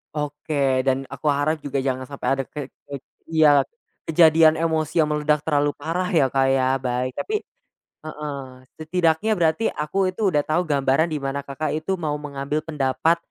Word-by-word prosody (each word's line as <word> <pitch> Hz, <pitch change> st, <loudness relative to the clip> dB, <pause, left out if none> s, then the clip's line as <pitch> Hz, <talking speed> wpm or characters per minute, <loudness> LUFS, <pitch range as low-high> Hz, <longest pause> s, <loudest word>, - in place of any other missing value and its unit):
Oke 145 Hz, -3 st, 0 dB
dan 135 Hz, 0 st, 0 dB
aku 150 Hz, -, -3 dB
harap 145 Hz, +2 st, 0 dB
juga 140 Hz, -1 st, -3 dB
jangan 130 Hz, -1 st, -1 dB
sampai 140 Hz, -1 st, -1 dB
ada 135 Hz, 0 st, -1 dB
ke 145 Hz, -2 st, -5 dB, 0.2 s
ke -, -, -8 dB, 0.4 s
iya, 150 Hz, -3 st, +5 dB, 0.5 s
kejadian 160 Hz, -1 st, +5 dB
emosi 160 Hz, -1 st, -1 dB
yang 155 Hz, -, +5 dB
meledak 150 Hz, 0 st, 0 dB
terlalu 145 Hz, -2 st, +2 dB
parah 180 Hz, +3 st, -2 dB
ya 155 Hz, -6 st, +3 dB
Kak, 135 Hz, 0 st, +3 dB
ya 135 Hz, 0 st, +2 dB
baik 125 Hz, 0 st, -2 dB
tapi 425 Hz, 0 st, -3 dB, 0.6 s
heeh, 145 Hz, -4 st, -6 dB, 0.3 s
setidaknya 165 Hz, +5 st, +1 dB
berarti 175 Hz, +4 st, +1 dB
aku 185 Hz, +5 st, -1 dB
itu 205 Hz, 0 st, +1 dB
udah 150 Hz, -3 st, +1 dB
tahu 160 Hz, +3 st, +1 dB
gambaran 140 Hz, +3 st, +2 dB
di 155 Hz, -, -2 dB
mana 135 Hz, 0 st, -3 dB
Kakak, 140 Hz, +2 st, -4 dB
itu 170 Hz, +5 st, -2 dB
mau 155 Hz, -3 st, -2 dB
mengambil 145 Hz, +1 st, -3 dB
pendapat, 150 Hz, +1 st, +1 dB
150 Hz, 165 wpm, -23 LUFS, 135-160 Hz, 0.6 s, iya